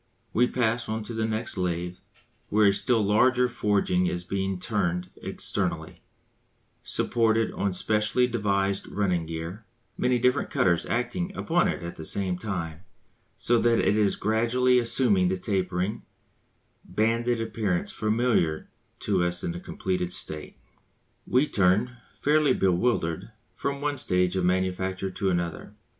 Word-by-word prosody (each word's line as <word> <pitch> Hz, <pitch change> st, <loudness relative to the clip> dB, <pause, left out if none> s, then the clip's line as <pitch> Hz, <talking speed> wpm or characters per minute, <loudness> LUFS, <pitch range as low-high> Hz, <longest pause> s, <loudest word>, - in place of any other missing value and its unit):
We 125 Hz, +2 st, +4 dB
pass 115 Hz, -2 st, 0 dB
on 110 Hz, 0 st, -2 dB
to 115 Hz, -, -7 dB
the 110 Hz, 0 st, -1 dB
next 110 Hz, -2 st, -3 dB
lathe 90 Hz, 0 st, -2 dB, 0.5 s
where 105 Hz, 0 st, +4 dB
a -, -, +2 dB
still 115 Hz, +1 st, +2 dB
larger 125 Hz, +5 st, +3 dB
forging 100 Hz, -5 st, +1 dB
is 90 Hz, 0 st, -2 dB
being 95 Hz, 0 st, -2 dB
turned 90 Hz, -3 st, -2 dB
externally, -, -, -3 dB, 0.8 s
supported 115 Hz, -1 st, +1 dB
on 100 Hz, -, -1 dB
specially 105 Hz, +6 st, +2 dB
devised 100 Hz, -4 st, 0 dB
running 90 Hz, -5 st, -1 dB
gear, 85 Hz, +6 st, -6 dB, 0.4 s
many 125 Hz, 0 st, +2 dB
different 125 Hz, +1 st, +1 dB
cutters 85 Hz, -2 st, +1 dB
acting 175 Hz, +10 st, -2 dB
upon 175 Hz, +1 st, +2 dB
it -, -, -3 dB
at 85 Hz, -, -6 dB
the 80 Hz, -, -7 dB
same 90 Hz, +1 st, +1 dB
time, 90 Hz, -7 st, -4 dB, 0.6 s
so 120 Hz, 0 st, +2 dB
that 115 Hz, 0 st, +3 dB
it 105 Hz, -, +2 dB
is 105 Hz, -2 st, +2 dB
gradually 120 Hz, +3 st, +2 dB
assuming 115 Hz, -6 st, +3 dB
the 95 Hz, +1 st, 0 dB
tapering, 95 Hz, +1 st, -1 dB, 0.8 s
banded 115 Hz, +5 st, 0 dB
appearance 110 Hz, -5 st, -1 dB
familiar 110 Hz, -8 st, 0 dB, 0.3 s
to 95 Hz, -4 st, +1 dB
us 85 Hz, 0 st, -1 dB
in -, -, -1 dB
the 85 Hz, -, -6 dB
completed 90 Hz, -1 st, -3 dB
state. 75 Hz, -3 st, -6 dB, 0.7 s
We 130 Hz, +4 st, +3 dB
turn, 105 Hz, +5 st, +2 dB, 0.2 s
fairly 150 Hz, 0 st, +3 dB
bewildered, 90 Hz, -2 st, 0 dB, 0.2 s
from 140 Hz, 0 st, -3 dB
one 145 Hz, -1 st, -1 dB
stage 90 Hz, -4 st, +1 dB
of 95 Hz, -1 st, +1 dB
manufacture 95 Hz, +1 st, -1 dB
to 95 Hz, +1 st, -1 dB
another. 85 Hz, -2 st, -3 dB
100 Hz, 140 wpm, -26 LUFS, 90-115 Hz, 0.8 s, We